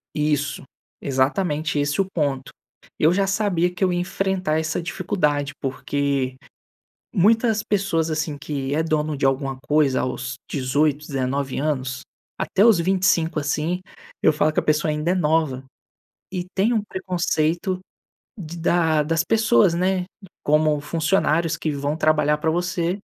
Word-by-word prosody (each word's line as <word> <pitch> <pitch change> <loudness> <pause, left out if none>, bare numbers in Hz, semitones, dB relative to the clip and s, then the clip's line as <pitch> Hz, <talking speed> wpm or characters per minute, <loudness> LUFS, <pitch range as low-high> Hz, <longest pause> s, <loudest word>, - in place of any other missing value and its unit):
Isso, 150 -2 0 0.4
exatamente 150 +3 0
esse 145 +6 +1
o 190 - -2
ponto! 140 -5 -2 0.5
Eu 160 +3 +4
já 195 0 +1
sabia 190 -4 +1
que 185 - -3
eu 180 -1 +2
ia 175 - 0
enfrentar 185 -3 -1
essa 155 +2 -2
dificuldade, 150 -6 -1
porque 135 -1 -1 0.8
muitas 220 +3 +3
pessoas, 180 -6 0
assim, 155 -1 -2
que 140 -1 -3
é 160 - +1
dono 155 -2 -1
de 135 - 0
alguma 135 0 0
coisa 145 -3 +2
aos 130 0 -3
18, 145 +2 0
19 135 -1 -2
anos, 130 -3 -2 0.4
até 195 - +1
os 225 -6 +6
25, 180 -3 +2
assim, 155 +5 -1 0.4
eu 155 - +5
falo 155 +1 +1
que - - +2
a - - -3
pessoa 155 0 +1
ainda 150 +3 0
é - - +1
nova, 155 -5 +1 0.7
e 180 -1 -3
tem 210 +5 +2
um 220 -3 +1
preconceito 180 -1 -1 0.6
de 170 -1 -7
da 165 -2 +2
das 165 +2 0
pessoas, 220 -5 +3
né, 185 +1 +1 0.4
como 150 0 +3
funcionários 165 0 +1
que 155 - -2
vão 145 +2 -2
trabalhar 150 -1 +2
pra 160 +1 0
você. 175 +2 -1
155 Hz, 145 wpm, -22 LUFS, 145-180 Hz, 0.8 s, os